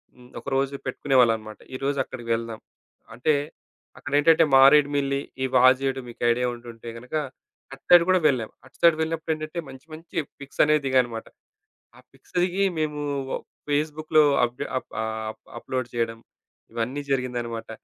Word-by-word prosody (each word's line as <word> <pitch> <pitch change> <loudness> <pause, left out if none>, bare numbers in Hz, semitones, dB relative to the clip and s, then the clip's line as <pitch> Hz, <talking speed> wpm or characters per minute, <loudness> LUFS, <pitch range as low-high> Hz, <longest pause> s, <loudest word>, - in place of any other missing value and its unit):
హ్మ్. 125 0 -17
ఒకరోజు 135 0 -1
పెట్టుకునేవాళ్ళన్నమాట. 120 -5 +1 0.2
ఈరోజు 140 +2 -2
అక్కడికి 120 -3 -9
వెళ్దాం. 115 -1 -5 0.6
అంటే, 150 +6 +2 0.6
అక్కడ - - -8
ఏంటంటే 160 +2 +5
మారేడుమిల్లి, 140 0 +5 0.2
ఈ - - +2
వాజేడు 130 +1 +4
మీకు 120 - -12
ఐడియా 125 +1 +1
ఉంటుంటే 120 -1 -10
గనక, 125 +6 -8 0.6
అటు 135 - -13
సైడ్ 175 -1 +8
కూడా 185 - +5
వెళ్ళాం. 125 -6 0 0.2
అటు - - -20
సైడ్ 170 -2 +6
వెళ్ళినప్పుడేంటంటే 160 0 -3
మంచి, 130 +1 -12
మంచి 165 +2 -12 0.2
పిక్స్ 140 -1 -3
అనే 150 - +4
దిగామన్నమాట. 125 -4 +1 0.7
ఆ - - -15
పిక్స్‌ - - -24
దిగి 185 +2 0 0.2
మేము 150 -1 -2 0.3
ఒ - - 0 0.3
ఫేస్‌బుక్‌లో 155 +1 +2 0.2
అప్‌డె 125 +4 -2
అప్ - - -6
ఆ - - -1 0.3
అప్ - - -20 0.2
అప్లోడ్ 130 -1 -3
చేయడం 115 -1 -1 0.5
ఇవన్నీ 120 +5 -3
జరిగిందన్నమాట. 120 -3 -2
135 Hz, 140 wpm, -25 LUFS, 120-150 Hz, 0.7 s, సైడ్